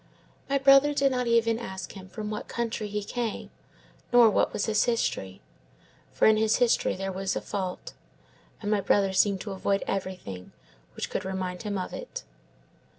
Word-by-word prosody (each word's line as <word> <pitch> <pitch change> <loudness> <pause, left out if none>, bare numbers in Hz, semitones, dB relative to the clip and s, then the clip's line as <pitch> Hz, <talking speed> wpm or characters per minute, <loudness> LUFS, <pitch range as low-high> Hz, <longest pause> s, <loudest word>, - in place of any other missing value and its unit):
My 275 - +3
brother 275 +2 +6
did 275 -1 +3
not 250 -1 -1
even 230 -1 +3
ask 190 -5 -6
him 190 -2 -11
from 210 +1 -5
what 210 - -5
country 230 -2 -3
he 210 0 -3
came, 230 +1 -4 0.6
nor 240 -2 +7
what - - +2
was 205 - -1
his 215 -1 +2
history. 160 - -1 0.7
For - - +2
in 220 0 +6
his 220 0 +3
history 245 -2 +2
there 190 0 -4
is 195 0 -1
a - - 0
fault, 185 -2 -5 0.7
and 205 - -1
my 210 -2 +2
brother 195 0 +2
seemed 195 0 +3
to 205 - -6
avoid 195 +1 0
everything 180 - -5 0.4
which - - -4
could - - -2
remind 185 -1 -4
him 205 -1 -3
of 185 - -4
it. - - -7
210 Hz, 175 wpm, -27 LUFS, 190-235 Hz, 0.7 s, nor